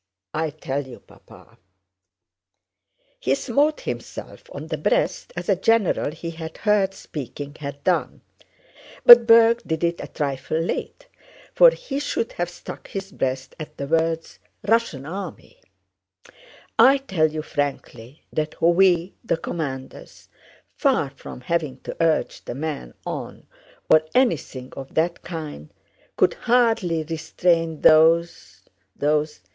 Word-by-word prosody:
I 160 0 -1
tell 140 -2 -4
you, 125 - -11
Papa" - - -19 1.6
(he 135 - +1
smote 280 - +1
himself - - -7
on - - -7
the - - -4
breast - - 0
as - - -5
a - - +3
general 225 -9 +2
he 165 +2 -6
had 160 -1 -8
heard 200 -2 +1
speaking 145 -2 -7
had 140 -1 -7
done, 180 -2 0 0.8
but 240 -1 +11
Berg 230 0 +6
did 160 0 -3
it 170 0 0
a - - -6
trifle 140 -1 -3
late - - -4 0.5
for - - +8
he 395 - -5
should 260 -5 -2
have 175 0 -3
struck 175 - -10
his 195 0 -6
breast 130 -3 -3
at 155 - -8
the 140 - -4
words 165 +2 -1 0.3
"Russian 225 - +1
army"), 200 - -8 1.2
"I 265 +5 +7
tell 190 - 0
you 155 0 -4
frankly 140 -3 -5
that 155 0 -3
we, 175 +1 +3
the 230 - 0
commanders, 140 -6 -6 0.4
far 260 - +1
from 135 -2 -11
having 150 -2 -2
to - - -7
urge 165 -1 +1
the - - -5
men 145 - -5
on - - -6 0.4
or 155 - +6
anything 155 - 0
of 135 -1 -9
that 170 +2 0
kind, 155 - -7 0.5
could - - +4
hardly 225 -9 +1
restrain 165 0 0
those... 160 - +4 0.3
those... 150 +1 0
165 Hz, 130 wpm, -23 LUFS, 145-195 Hz, 1.6 s, but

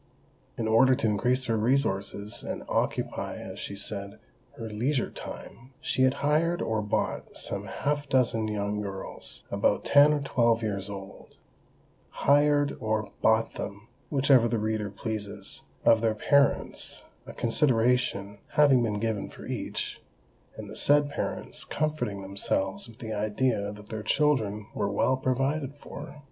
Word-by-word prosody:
In 110 - -1
order 130 +4 +5
to 135 - -2
increase 125 +5 +2
her 115 - +1
resources, 105 -4 0
and - - -5
occupy, - - -1
as - - -8
she 100 - -5
said, 100 0 -6 0.4
"her 115 - -5
leisure 120 +5 0
time," 130 +3 -8
she - - -1
had 130 0 +4
hired 165 +4 +2
or 110 -1 0
bought 105 -1 -2
some - - -3
half 145 0 -2
dozen 115 -4 +2
young 105 0 -2
girls, 100 -2 -5
about - - +1
ten 145 +1 +7
or 150 - +2
twelve 115 -5 +2
years 100 -2 -2
old;—hired 145 +8 -1
or 110 -2 -1
bought 110 0 +3
them, 100 +3 -7 0.2
whichever 135 -4 +5
the 115 0 0
reader 110 -1 -1
pleases, 105 -1 -5 0.2
of 115 - +6
their 110 -1 +2
parents, 140 +5 +1 0.2
a - - -7
"consideration" 115 -5 +1
having 140 -4 +6
been 105 -3 0
given 110 -2 -2
for - - -11
each, - - -4 0.6
and - - -7
the - - -9
said 145 0 +3
parents - - -4
comforting 150 -10 -2
themselves 95 +1 -1
with 115 - -14
the 110 -2 -5
idea 105 0 0
that 105 0 -12
their 110 -1 -4
children 110 -7 +1
were 100 -1 -1
well 105 +6 +2
provided 135 +2 -1
for! 145 0 -9
115 Hz, 145 wpm, -28 LUFS, 105-135 Hz, 0.6 s, ten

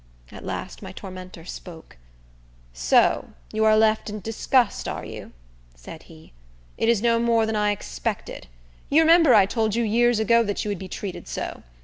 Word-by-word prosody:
At - - -11
last - - -6
my - - -8
tormentor 185 -3 -10
spoke. 165 - -10 0.8
"So - - +2 0.2
you 220 0 +1
are 215 0 +5
left 220 0 +2
in 210 +1 -5
disgust, 225 +3 0
are - - -5
you?" - - -9 0.4
said 110 - -11
he. 160 - -16 0.4
"It 225 - 0
is 230 -2 +2
no 230 -1 +3
more 230 -1 +2
than 220 0 -2
I 210 0 +1
expected. 65 - -4 0.4
You 310 +3 +5
remember 325 -5 +6
I 200 -2 +6
told 220 +1 -1
you 235 - +1
years 235 +2 +2
ago 230 +2 +4
that 205 -2 -2
you - - -2
would 200 -3 -3
be 190 - -7
treated 190 +1 -7
so. - - -5
215 Hz, 175 wpm, -24 LUFS, 185-230 Hz, 0.8 s, remember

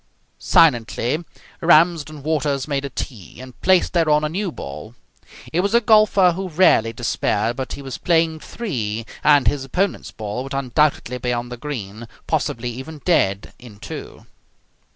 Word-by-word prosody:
Silently 125 +1 +2 0.4
Ramsden 160 -3 +3
Waters 145 -3 -1
made 140 -2 -2
a - - -4
tee 115 - -7
and 130 -1 -12
placed 185 -1 +3
thereon 155 -3 +3
a 150 - 0
new 185 +3 -2
ball. 75 - -9 0.6
He 170 - +1
was 200 +4 +1
a - - +7
golfer 215 -4 +5
who 185 +2 -4
rarely 155 -9 +4
despaired, 115 -1 -1
but 130 0 -5
he 140 - -8
was 135 -2 -6
playing 165 -2 +1
three, 115 - -4 0.2
and 145 -3 +5
his 145 -2 +1
opponents' 180 +9 -2
ball 105 +2 -5
would 135 +1 -6
undoubtedly 135 -1 0
be 125 0 -2
on 120 0 -3
the 125 - -6
green, 115 -5 -6 0.2
possibly 120 +1 -2
even 140 +5 -9
dead, 100 - +1
in 120 -4 -13
two. 110 - -9
140 Hz, 155 wpm, -21 LUFS, 120-165 Hz, 0.6 s, a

